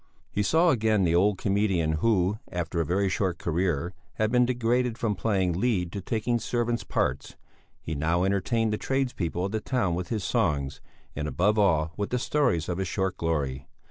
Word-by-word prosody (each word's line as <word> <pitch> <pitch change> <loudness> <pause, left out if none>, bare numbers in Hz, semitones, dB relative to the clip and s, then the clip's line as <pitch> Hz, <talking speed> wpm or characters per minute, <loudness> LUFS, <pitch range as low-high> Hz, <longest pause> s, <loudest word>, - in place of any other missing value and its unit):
He 105 - 0
saw 165 - +4
again 110 -5 +2
the 85 -2 +2
old 95 +3 +3
comedian 95 -6 +1
who, 105 -2 +2
after 85 -1 -2
a - - -1
very 95 +3 +1
short 95 -2 0
career, 85 0 -1 0.2
had 110 0 0
been 125 0 +4
degraded 120 -1 0
from 110 -3 0
playing 95 -1 0
lead 95 -8 0
to 100 - -5
taking 115 +4 -1
servant's 120 0 -1
parts; 65 +2 -2 0.4
he 80 - -5
now 80 +4 +1
entertained 105 +4 +1
the 105 - -2
tradespeople 125 - -1
of 100 - -3
the 110 0 -2
town 120 -10 0
with 90 +1 -3
his 110 -4 -2
songs, 75 - 0 0.3
and, 75 - -3
above 105 +7 +1
all, 80 -5 +2
with 100 -1 -2
the 125 - 0
stories 125 - +1
of 90 0 -2
his 95 - -1
short 95 -1 -1
glory. 70 -5 -2
95 Hz, 185 wpm, -27 LUFS, 85-115 Hz, 0.4 s, saw